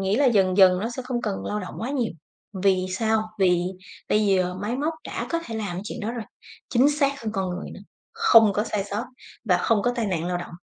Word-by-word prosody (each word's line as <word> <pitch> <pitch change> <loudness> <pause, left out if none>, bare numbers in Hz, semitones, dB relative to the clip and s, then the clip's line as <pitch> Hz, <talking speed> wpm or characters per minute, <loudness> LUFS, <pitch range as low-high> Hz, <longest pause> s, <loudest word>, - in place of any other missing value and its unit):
nghĩ 195 +2 +1
là 285 +2 +4
dần 195 -6 +3
dần 185 -2 +6
nó 220 - -1
sẽ 255 +2 -5
không 250 -1 -3
cần 205 -3 -3
lao 210 0 -2
động 185 - -7
quá 235 +4 -3
nhiều, 255 -5 -1 0.4
vì 190 -1 +1
sao? 220 +3 +1 0.2
Vì 180 -2 +3 0.5
bây 210 0 +2
giờ 185 -2 +2
máy 205 +6 -3
móc 305 +4 -1
đã - - -4
có 335 - +1
thể 230 - -6
làm 210 -5 -3
cái - - -3
chuyện 235 - -6
đó 220 +2 -2
rồi, 230 -3 -5 0.4
chính 255 +3 +4
xác 280 -1 0
hơn 215 - -3
con 190 -3 -2
người 180 +2 -5
nữa, - - -10 0.3
không 230 - +6
có 210 +2 0
sai 205 -3 -2
sót 210 +3 -3 0.4
và 185 -5 +3
không 210 +2 +2
có 245 - +1
tai 230 - 0
nạn 170 -4 -1
lao 180 0 -1
động. 175 - -7
210 Hz, 245 wpm, -24 LUFS, 190-240 Hz, 0.5 s, dần